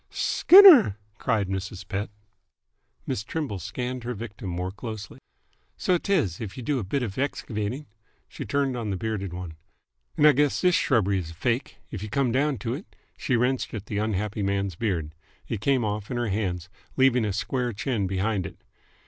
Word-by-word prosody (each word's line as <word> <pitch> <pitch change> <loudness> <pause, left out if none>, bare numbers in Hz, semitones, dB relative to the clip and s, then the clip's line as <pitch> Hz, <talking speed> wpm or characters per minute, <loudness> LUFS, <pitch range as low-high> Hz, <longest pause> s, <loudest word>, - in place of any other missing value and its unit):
"Skinner!" 345 - +7 0.2
cried 110 -5 0
Mrs. 95 0 -5
Pett. 100 +1 -3 1.0
Miss 100 - -2
Trimble 135 - -4
scanned 125 +7 -4
her 120 0 -3
victim 100 -3 -7
more 90 +1 -3
closely. 110 0 -8 0.6
"So 185 - +2
't 200 - -4
is, 120 - +1
if 105 0 -6
y' - - -5
do 140 +1 0
a - - -3
bit 125 +8 -1
'f 105 0 -4
excavating." 125 -1 -3 0.4
She - - -7
turned 140 -2 0
on 115 -3 -3
the 95 - -2
bearded 105 -3 -3
one. 90 -3 -7 0.6
"'nd - - +6
I 150 - +9
guess 145 +3 +1
all 180 - +6
this 175 - +2
shrubbery 100 -7 +2
is 85 -3 -6
fake, 120 - -2 0.2
'f 100 - -4
you 105 - -5
come 135 0 +1
down 140 +2 +1
to 115 +3 -3
it!" 155 +10 -9 0.2
She 125 - -1
wrenched 125 +1 0
at 105 -2 -6
the 105 -1 -3
unhappy 105 0 -2
man's 100 -1 0
beard. 85 -5 -2 0.3
It 110 - -3
came 130 -1 +2
off 105 0 -3
in 125 - -2
her 120 -2 -1
hands, 90 -4 -2 0.3
leaving 130 -3 +4
a 105 - 0
square 125 +5 -1
chin 110 -2 -1
behind 95 0 -1
it. - - -13
110 Hz, 190 wpm, -26 LUFS, 100-130 Hz, 1.0 s, I